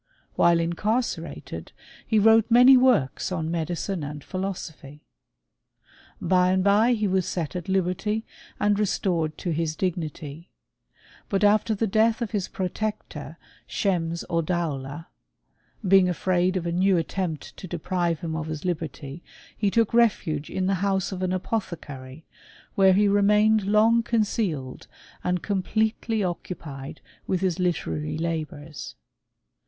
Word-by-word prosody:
While 170 -1 +4
in* 165 +1 0
carcerated 220 +7 -3 0.3
he 220 - +2
wrote 225 +1 +5
many 250 +3 +8
works 250 - +2
on 160 -3 -2
medicine 170 +1 -2
and 145 0 -6
pliilosophy. 165 -7 -6 1.2
By 180 -1 +3
and 185 0 +2
by 210 +5 +4
he 215 -2 0
was 190 -1 +1
set 170 -1 -3
at 180 0 -5
liberty, 195 +4 0 0.3
and 205 0 +2
restored 175 -6 0
to 175 - -3
his 160 0 -1
dignity; 160 -3 -4 0.8
but 200 0 0
after 215 +1 +3
the 225 - 0
death 220 +2 +2
of 225 - -5
his 205 -4 -1
pro* 185 - -3
tector, 215 +3 -5 0.3
Schems 170 -4 -1
Oddaula^ 165 -3 -2 0.8
being 190 -1 +6
afraid 185 +1 +1
of 175 - -3
a 170 - -1
new 185 +2 +3
at 165 - -1
tempt 175 -6 -4
to 185 - -8
deprive 175 -1 -1
him 160 -2 -3
of 160 0 -3
his 155 +1 -5
liberty, 160 -3 -4 0.3
he 205 - +1
took 230 +2 +1
refuge 190 -10 +2
iit' 185 - -2
the 195 - +2
house 195 -1 0
or 185 0 -4
an 185 - 0
apothecary, 160 -8 -4 0.5
where 190 -1 +5
he 205 +2 +4
remained 210 +1 +4
lon|f 225 +3 +4
concealed 205 - -1 0.4
and 180 -1 -1
completely 220 +2 0
occupied 155 -6 -6 0.3
with 185 -1 0
his 185 -3 0
literacy 80 - -1
labours. 160 -3 -5
185 Hz, 140 wpm, -25 LUFS, 165-205 Hz, 1.2 s, many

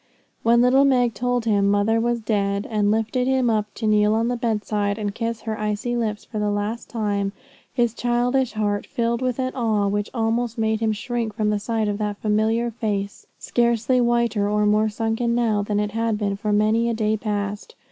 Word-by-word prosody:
When 235 +1 +4
little 255 +3 +5
Meg 250 -4 +3
told 245 +2 -1
him 200 -3 +2
mother 205 +3 +2
was 240 0 0
dead, 200 -2 0
and 210 -2 +2
lifted 225 +4 0
him 260 -3 +2
up 210 -1 -1
to 225 - -4
kneel 210 0 +3
on 230 +2 +1
the 245 - 0
bedside 210 -3 -1
and 205 -2 -3
kiss 230 0 -3
her 220 0 -4
icy 215 +3 -2
lips 215 -3 -2
for 215 - -5
the 210 0 0
last 205 +3 -3
time, 205 -3 -1 0.4
his 240 -3 +1
childish 245 +1 0
heart 205 -1 -1
was - - -33
filled 235 -1 0
with 255 -1 -1
an 255 -1 -2
awe 220 -5 +1
which 205 +1 -1
almost 230 0 -1
made 220 -1 +1
him 220 -1 +1
shrink 230 0 -3
from 215 -2 +1
the 210 - 0
sight 220 +1 -1
of 205 0 -2
that 210 -1 -2
familiar 220 +3 +1
face, 205 -3 -3
scarcely 235 +1 +1
whiter 235 -4 +1
or 210 0 +2
more 215 +1 +3
sunken 225 +2 -1
now 225 -4 +1
than 205 0 -1
it 210 0 -1
had 225 0 0
been 200 -2 -1
for 210 +1 -2
many 215 +3 +2
a 230 - -1
day 215 -1 +1
past. 210 - -4
220 Hz, 205 wpm, -23 LUFS, 210-235 Hz, 0.4 s, little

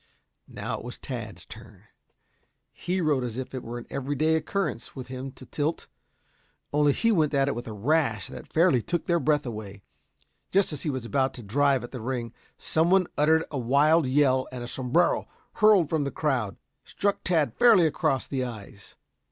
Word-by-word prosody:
Now - - -5
it - - -11
was - - -7
Tad's - - -7
turn. - - -13 0.9
He 180 +1 -2
rode 150 -5 +1
as 120 -1 -4
if 130 0 -5
it 130 - -4
were 120 +1 -6
an 120 - -8
everyday 145 +3 0
occurrence 160 -4 -3
with 130 -2 -8
him 130 +1 -6
to - - -13
tilt, 150 +2 -2 0.9
only 145 0 +4
he 230 +10 +1
went 155 -7 +2
at 135 0 +3
it 140 - 0
with 120 0 -6
a - - -5
rash 115 -2 +1
that - - -10
fairly 160 -6 +4
took 170 +6 -2
their 170 -1 +2
breath 150 -2 +1
away. 105 -4 -7 0.7
Just 195 -4 +2
as 145 - -6
he 155 - -2
was 130 -4 -3
about 135 +2 0
to 120 - -9
drive 135 +4 +2
at 120 - -8
the 125 - -6
ring, 120 -1 -3 0.2
some 160 +2 +1
one 190 0 +4
uttered 160 +2 +3
a 140 - -2
wild 145 +5 +3
yell 130 -1 +3
and 125 -1 -6
a - - -6
sombrero 130 +8 +1 0.3
hurled 210 -6 +5
from 155 -1 0
the 140 - -1
crowd, 130 -10 -1 0.3
struck 200 0 -2
Tad 155 -9 +1
fairly 220 - +6
across 135 -3 0
the 135 -2 -2
eyes. 105 -4 -9
140 Hz, 190 wpm, -26 LUFS, 125-160 Hz, 0.9 s, fairly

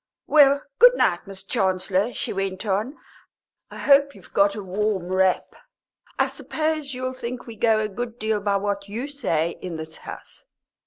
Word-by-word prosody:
"Well, 285 -2 +5 0.2
good - - +8
night, - - +1
Miss 195 -1 -9
Chancellor," 190 +3 0
she - - -4
went 195 +1 -3
on; 210 +8 -1 0.7
"I - - -10
hope 280 0 +4
you've - - -16
got 200 0 +3
a 210 - -5
warm 190 -1 -1
wrap. 185 0 +1 0.6
I - - +4
suppose 310 -3 -3
you'll 255 0 -3
think 250 0 -6
we 230 - -9
go 220 0 +3
a 215 - 0
good 230 +3 -5
deal 215 -1 -1
by 200 0 +1
what 200 0 -3
you 235 +7 -4
say 170 - -1
in 175 -3 -5
this 160 0 -7
house. - - -11
210 Hz, 170 wpm, -24 LUFS, 190-255 Hz, 0.7 s, good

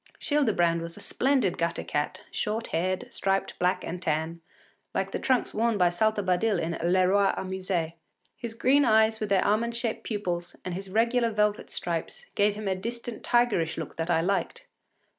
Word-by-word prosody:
Childebrand 195 - +2
was 170 0 -7
a - - -9
splendid 260 -9 +1
gutter 170 0 -1
cat, 150 0 -2
short 220 +2 -2
haired, 185 +3 -1
striped 195 0 -1
black 180 +1 +1
and 175 +1 -5
tan, 160 +1 -1 0.5
like - - -1
the - - -2
trunks 260 -2 +1
worn 225 0 +1
by 180 -2 +4
Saltabadil 205 +2 +1
in 165 +1 -2 0.2
“le 185 0 +4
Roi 200 +1 +4
s’amuse.” 185 -3 -2 0.4
His 235 -3 -7
great - - -24
green 280 +3 +5
eyes 220 -1 +4
with 215 - -3
their 195 -2 +3
almond 230 +3 +1
shaped 230 -1 -2
pupils, 180 -5 -3
and 180 - -3
his 190 +2 -6
regular 230 +3 +2
velvet 210 -1 0
stripes, 175 - -4
gave 205 0 +2
him 210 -1 -5
a 190 - +2
distant 235 +4 -5
tigerish 220 -10 +2
look 160 -3 -6
that 165 +1 -2
I 165 -2 +3
liked. 195 +3 -1
195 Hz, 180 wpm, -27 LUFS, 175-225 Hz, 0.5 s, green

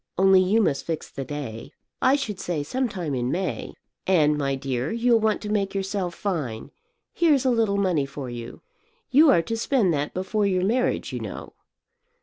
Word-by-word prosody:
Only 190 0 +6
you 210 +5 +3
must 140 -7 0
fix 165 -2 -4
the 135 - -5
day. 135 -2 -7 0.3
I 265 - +5
should 210 -9 -3
say 165 -5 -2
some 255 - -1
time 175 -8 -4
in 125 -1 -1
May. 185 0 -3 0.3
And, 155 -5 +4
my 140 -2 -1
dear, 135 0 -3
you'll 235 0 +3
want 220 -1 +1
to 210 - -4
make 200 -2 -1
yourself 195 -2 -2
fine; 155 - -3 0.4
here's 295 -6 +3
a 260 - +4
little 225 -4 +1
money 180 -8 +1
for 140 -1 -7
you. 120 -1 -8 0.5
You 295 +4 +6
are 170 -11 +4
to 225 - -3
spend 225 -5 +1
that 145 0 -2
before 200 +3 0
your 185 -1 +1
marriage, 245 +5 0
you - - -3
know." - - -7
185 Hz, 185 wpm, -24 LUFS, 145-220 Hz, 0.5 s, Only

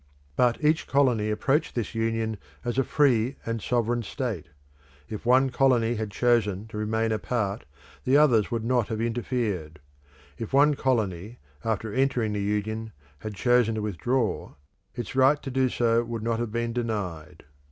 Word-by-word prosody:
But 125 - +2
each 155 +1 +2
colony 125 -7 +2
approached 135 +8 0
this 120 -4 -2
Union 115 -1 -1 0.3
as 120 +2 0
a - - +4
free 130 -3 +2
and 115 -1 -2
sovereign 120 +1 0
state. 115 - -4 0.6
If 110 +1 -7
one 130 +1 +4
colony 120 -3 +3
had 110 -2 -3
chosen 105 -3 +1
to 105 - -7
remain 110 +1 0
apart, 105 -1 -2 0.4
the 130 +2 +4
others 125 -9 +4
would 115 -1 -2
not 120 -2 +1
have 110 - -3
interfered; 115 - -2 0.6
if 115 +2 -6
one 145 +2 +5
colony 110 -6 -1 0.3
after 110 -1 -2
entering 125 -4 +1
the 105 - -2
Union 110 +2 -2 0.3
had 105 -1 -6
chosen 120 0 +3
to 110 - -3
withdraw, 115 +4 -1 0.4
its 120 0 -5
right 135 +3 +5
to 135 - -5
do 130 0 +2
so 115 -1 +2
would 115 -2 -5
not 115 0 0
have 120 -2 -2
been 115 0 -2
denied. 100 -10 -4
115 Hz, 160 wpm, -26 LUFS, 110-125 Hz, 0.6 s, one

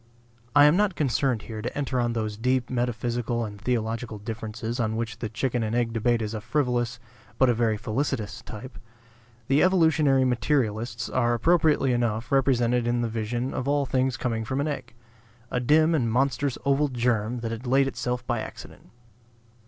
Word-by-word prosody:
I 145 - +8
am 150 +2 +6
not 200 -2 +2
concerned 130 -5 0
here 110 0 -6
to 125 +5 -5
enter 135 -3 -1
on 120 -1 0
those 110 -2 -2
deep 125 +3 0
metaphysical 120 -1 -1
and 105 -1 -9
theological 115 -1 -2
differences 110 +2 -5
of 110 -2 +1
which 115 -1 -4
the 115 - -3
chicken 120 +2 -1
and 110 +1 -1
egg 120 -2 0
debate 115 0 +1
is 105 0 -4
a 110 - -4
frivolous, 125 -1 -1 0.4
but 130 - +4
a - - +4
very 115 -2 +1
felicitous, 110 -1 -2
type. 120 +3 -9 0.7
The 135 +3 +3
evolutionary 160 -7 +4
materialists 120 -3 0
are 120 -1 +1
appropriately 155 -1 +3
enough 120 0 -1
represented 125 -3 +2
in 120 0 +1
the 120 - -1
vision 115 +3 -2
of 130 - -3
all 145 0 +2
things 130 0 0
coming 115 -3 -2
from 130 +5 -2
an 145 - 0
egg, 145 -5 -5 0.6
a 125 - 0
dim 155 +6 +4
and 120 -8 +1
monstrous 135 +1 +1
oval 140 +2 +3
germ 120 -2 0
that 115 -1 -3
had 115 +2 -6
laid 135 +2 +4
itself 125 -1 -3
by - - -1
accident. - - -9
120 Hz, 175 wpm, -26 LUFS, 115-135 Hz, 0.7 s, I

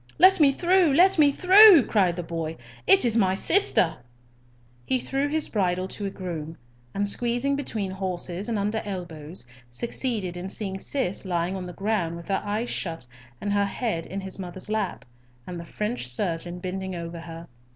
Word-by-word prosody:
"Let 380 +1 +6
me 285 -3 +6
through! 345 +1 +3
let 360 +1 +5
me 290 -2 +6
through!" 375 - +8
cried 185 -5 +2
the 175 - -4
boy; 165 -1 -5 0.3
"it 195 - +6
is 230 -2 +2
my 190 -4 +2
sister." 190 - +3 0.9
He 260 - 0
threw 270 +3 -2
his 310 +1 -1
bridle 185 -3 -1
to 200 0 -5
a - - -2
groom, 165 -4 -6 0.4
and, 205 +1 0
squeezing 240 +6 0
between 220 -9 -4
horses 185 +1 -3
and 225 - -1
under 210 +2 -1
elbows, 175 - -4 0.2
succeeded 205 - -3
in 180 +2 -6
seeing 195 -1 -3
Cis 200 -5 -2
lying 175 -1 -2
on 185 -1 -5
the 175 - -8
ground 195 -5 -1
with 170 +3 -11
her 195 - 0
eyes 215 +4 -2
shut 165 -6 -4 0.3
and 205 0 -2
her 205 0 +2
head 200 -5 -3
in 195 +2 -5
his 190 0 -2
mother's 185 +1 -7
lap, 215 -4 -2 0.4
and 175 -1 -7
the 170 - -8
French 210 - -3
surgeon 170 +5 -3
bending 190 +1 -5
over 170 0 -6
her. 165 0 -9
195 Hz, 180 wpm, -25 LUFS, 175-235 Hz, 0.9 s, through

